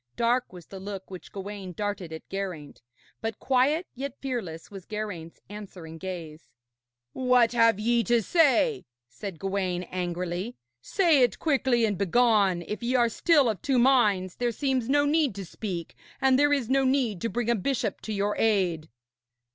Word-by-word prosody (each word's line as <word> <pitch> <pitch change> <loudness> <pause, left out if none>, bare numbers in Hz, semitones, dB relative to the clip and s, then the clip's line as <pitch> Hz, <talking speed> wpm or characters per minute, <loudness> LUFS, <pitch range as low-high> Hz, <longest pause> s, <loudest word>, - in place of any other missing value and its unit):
Dark 240 +2 +1
was 180 -2 -12
the 195 - -10
look 195 -1 -7
which 185 - -9
Gawaine 195 -2 -7
darted 200 -2 -4
at 160 - -8
Geraint, 185 -7 -6 0.4
but 225 -2 -3
quiet 275 +6 +2
yet 275 +1 -6
fearless 210 -13 -5
was 195 -3 -10
Geraint's 205 -7 -6
answering 185 -6 -9
gaze. 170 -4 -7 0.6
'What 250 -2 +3
ye 240 - -2
have 230 -3 +5
to 235 +2 +2
say,' 330 - +3 0.2
said 170 - -8
Gawaine 185 0 -2
angrily, 180 +4 -3 0.2
'say 330 - +3
it 240 -5 +3
quickly 260 -6 +2
and 205 -3 -2
begone. 200 -3 +3
If 210 +6 -5
ye 240 +2 0
are 240 -2 +4
still 295 +2 +3
of 215 -5 -2
two 270 -2 +1
minds, 215 -8 +3
there 240 -1 0
seems 260 0 -1
no 290 +1 +3
need 290 - +2
to 195 -1 -6
speak, 175 -2 -6 0.2
and 265 -1 +4
there 290 0 +4
is 275 -5 +1
no 270 +2 +2
need 255 -8 +1
to 230 - -1
bring 235 0 -1
a - - +3
bishop 225 -2 -2
to 220 - -6
your 205 0 0
aid.' 180 -8 +1
215 Hz, 170 wpm, -27 LUFS, 185-255 Hz, 0.6 s, have